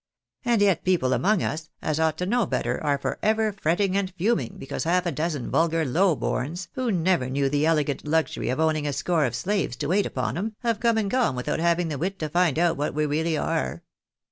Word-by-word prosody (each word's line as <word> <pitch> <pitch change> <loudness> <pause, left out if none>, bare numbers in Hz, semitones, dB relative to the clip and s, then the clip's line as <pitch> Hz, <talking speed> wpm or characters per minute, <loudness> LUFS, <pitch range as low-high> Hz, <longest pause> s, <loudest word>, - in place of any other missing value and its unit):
And 235 -4 +3
yet 190 -5 +2
people 170 -9 +2
among 200 +5 +2
us, 155 0 -3
as 155 0 -1
ought 160 -1 +1
to 180 - -2
know 230 +1 +1
better, - - -2
are 145 -2 +2
for 140 - -4
ever 220 0 +2
fretting 190 +1 0
and 200 -1 0
fuming 210 +1 0
because - - -4
half 180 +2 +1
a 175 - 0
dozen 155 -2 -3
vulgar 165 -1 +2
low 165 +4 +2
borns, 165 +9 -3
who 255 -3 -1
never 175 -7 +1
knew 140 +1 +1
the 145 +2 +1
elegant 150 -3 0
luxury 160 -5 0
of 130 - -1
owning 155 -2 +1
a 145 - -1
score 155 +2 +1
of 120 -2 -2
slaves 185 - -1
to 145 +4 -3
wait 200 +3 +2
upon - - -2
'em, 215 +2 -3
have 230 -3 0
come 230 -1 +2
and 205 -3 0
gone 245 - +2
without 125 +4 -2
having 170 0 +1
the 145 -3 -4
wit 190 +5 -2
to 155 -4 -3
find 175 -2 +2
out 170 -2 +2
what 145 +1 -2
we 155 - +1
realljr 155 +1 0
are. 65 0 -2
165 Hz, 225 wpm, -25 LUFS, 150-195 Hz, -, And